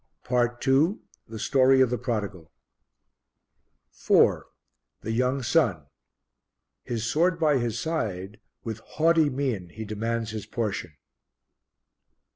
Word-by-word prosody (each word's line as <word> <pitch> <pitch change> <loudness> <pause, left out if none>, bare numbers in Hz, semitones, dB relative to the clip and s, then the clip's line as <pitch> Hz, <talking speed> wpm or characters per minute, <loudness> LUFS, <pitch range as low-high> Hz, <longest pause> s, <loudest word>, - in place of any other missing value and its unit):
PART 120 0 0
II 150 +10 +3 0.3
The 110 - -8
Story 135 +3 +4
of 130 -2 +4
the 125 - 0
Prodigal 100 - -4 1.4
4. - - +3 0.5
The 110 - -4
Young 125 +3 0
Son. 115 - +1 1.0
His 115 -2 -4
sword 165 +9 +2
by 150 -4 +3
his 115 -1 -2
side, 105 - -3 0.2
with 110 -1 -5
haughty 160 +4 +2
mien 130 -10 -2
he 110 +5 -8
demands 115 +1 -3
his 105 -2 -6
portion. 105 -7 -3
120 Hz, 110 wpm, -26 LUFS, 110-135 Hz, 1.4 s, Story